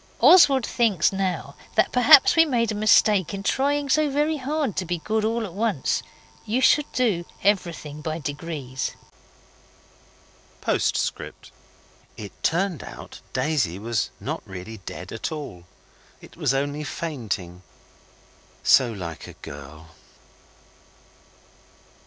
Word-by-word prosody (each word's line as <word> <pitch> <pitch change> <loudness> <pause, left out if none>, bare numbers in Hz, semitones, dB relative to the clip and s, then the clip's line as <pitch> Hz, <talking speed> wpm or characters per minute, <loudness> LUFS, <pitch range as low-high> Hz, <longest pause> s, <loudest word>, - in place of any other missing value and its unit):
Oswald 275 -9 +7
thinks 210 -8 +1
now 190 -1 -2 0.2
that - - +3
perhaps 250 +2 +7
we 325 - +7
made 235 -7 0
a - - -2
mistake 210 -3 +3
in 195 - -6
trying 285 +6 0
so 305 +2 +2
very 300 +3 0
hard 285 - -2
to 185 - 0
be 175 0 -2
good 215 +6 -1
all 225 +1 0
at 185 - -9
once. 205 - 0 0.4
You 230 +4 -1
should 295 +3 +3
do 215 -9 +1 0.2
everything 170 -7 -1
by 155 +1 -3
degrees. 145 -4 -5 1.7
P.S. - - +1 1.1
It 105 -2 -8
turned 175 - 0
out - - -10
Daisy 130 - 0
was 115 +2 -2
not - - -4
really 95 +4 -9
dead 90 - -7
at 115 - -4
all. 140 - -7 0.5
It - - -15
was - - 0
only 145 +2 -2
fainting 110 - -5 1.0
so 125 -3 +5
like 85 -7 -7
a - - -10
girl. 75 +3 -11
170 Hz, 120 wpm, -24 LUFS, -, 1.7 s, Oswald